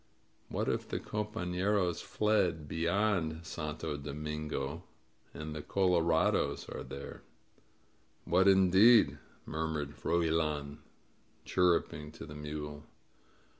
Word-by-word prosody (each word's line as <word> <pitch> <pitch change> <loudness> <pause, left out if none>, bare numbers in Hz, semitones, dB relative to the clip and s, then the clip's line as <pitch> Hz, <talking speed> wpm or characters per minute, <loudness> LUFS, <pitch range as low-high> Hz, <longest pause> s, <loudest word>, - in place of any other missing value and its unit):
What - - -2
if - - -1
the - - -2
compafleros 100 -3 -1
fled 95 -6 +1
beyond 85 -1 0
Santo 75 -1 -4
Do 70 0 -6
mingo 75 0 -4 0.5
and 75 0 -6
the 75 - -4
color 90 0 +2
ados 80 -1 +1
are - - -5
there?" 70 - -8 1.0
"What 90 +3 +4
indeed?" 95 +4 +6 0.3
murmured 80 -2 -3
Froilan, 80 -3 0 0.7
chirruping 85 -4 +1
to - - -9
the 75 - -10
mule. 75 0 -6
80 Hz, 100 wpm, -32 LUFS, 75-95 Hz, 1.0 s, indeed